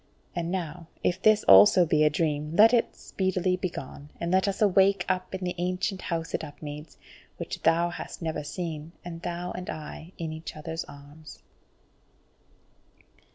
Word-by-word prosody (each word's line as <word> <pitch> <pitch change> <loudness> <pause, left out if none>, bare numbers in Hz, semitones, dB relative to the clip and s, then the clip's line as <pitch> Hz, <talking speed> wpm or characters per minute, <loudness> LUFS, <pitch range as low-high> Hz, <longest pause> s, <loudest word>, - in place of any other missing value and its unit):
And 170 -1 -2
now 170 -2 -4 0.2
if 185 +1 0
this 215 0 +5
also 100 - +8
be 155 -1 +3
a 150 - +5
dream, 150 0 -1
let 225 +5 +7
it 235 - +2
speedily 185 -1 -1
begone, 150 -5 -6
and 170 0 -2
let 190 +2 +3
us 195 - -1
wake 195 -1 +4
up 185 +1 -1
in 190 - -5
the 180 0 -1
ancient 185 +2 -1
House 165 -1 -3
at - - -1
Upmeads, 150 0 -9 0.4
which - - -6
thou 170 +1 +3
hast - - -7
never 160 -3 -3
seen 160 0 -5
and 165 -1 -7
thou 175 +1 -4
and 180 0 -6
I 155 +2 -7
in 160 -2 -4
each 160 +1 -8
other's 160 +2 -5
arms." 145 +2 -13
170 Hz, 160 wpm, -27 LUFS, 155-185 Hz, 0.4 s, also